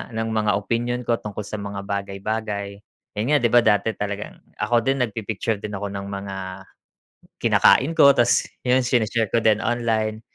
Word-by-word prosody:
ng 115 0 -2
mga 105 -1 +1
opinyon 120 +4 -1
ko 115 0 +1
tungkol 105 0 -6
sa 105 +1 -6
mga 100 -1 -6
bagay-bagay. 100 +1 -4 0.4
Yun 115 - -1
nga, - - +6
'di 120 - +4
ba, 120 - +7
dati 105 -1 +2
talagang 105 0 -5 0.2
ako 120 -1 +1
din 135 -1 +2
nagpi-picture 110 -1 -3
din 105 -1 -6
ako 100 0 -4
ng 100 0 -6
mga 100 0 -6 1.1
kinakain 145 +6 +4
ko 140 0 +8
tas 120 -2 +3 0.2
yun 125 0 +2
sine-share 115 -3 0
ko 115 - +3
din 110 -1 +2
online. 110 -2 0
110 Hz, 170 wpm, -23 LUFS, 100-120 Hz, 1.1 s, ko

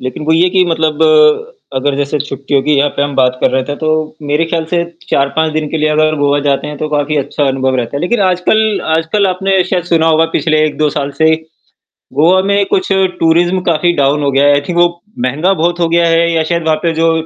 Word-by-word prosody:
लेकिन 130 +4 -6
वो 160 - +1
ये 170 +3 +3
कि 185 0 +2
मतलब 160 -2 -1 0.7
अगर 135 +1 -1
जैसे 145 +1 -1
छुट्टियों 140 0 -2
की 150 - +1
यहाँ 145 +1 +2
पे - - +1
हम 145 0 -2
बात 130 -1 +1
कर - - +2
रहे 130 0 0
थे, 145 +2 -5
तो 155 0 -2
मेरे 150 +3 +1
ख़्याल 165 0 -2
से 175 -1 +1 0.3
4-5 155 +3 0
दिन 155 -1 -2
के - - -2
लिए 155 0 +1
अगर 155 0 +1
गोवा 145 0 +1
जाते 140 0 0
हैं, 150 0 -6
तो 155 - -3
काफ़ी 150 0 -1
अच्छा 145 +1 -1
अनुभव 130 0 -1
रहता 125 +2 -3
है। - - -3
लेकिन 190 +7 -1
आजकल 200 +3 +1 0.2
आजकल 165 +6 0
आपने 190 0 0
शायद 180 -2 -2
सुना 165 -2 +1
होगा 160 0 +3
पिछले 155 -1 +1
1-2 155 0 0
साल 145 -1 -3
से, 160 0 +4 0.8
गोवा 165 +7 +3
में 200 +1 +1
कुछ 185 -1 -1
टूरिज़्म 180 -1 +1
काफ़ी 170 +2 +1
डाउन 145 +1 +1
हो 140 - +1
गया 135 +1 +2
है। 145 - +5
आई 145 - +2
थिंक 175 -1 -2
वो 175 0 +5 0.4
महँगा 155 +9 0
बहुत 175 0 -1
हो 170 - +1
गया 170 +1 +2
है 165 0 +2
या 165 -1 +1
शायद 170 +1 -2
वहाँ 160 -1 +1
पे 170 - 0
जो 165 +1 +2
155 Hz, 235 wpm, -13 LUFS, 145-175 Hz, 0.8 s, है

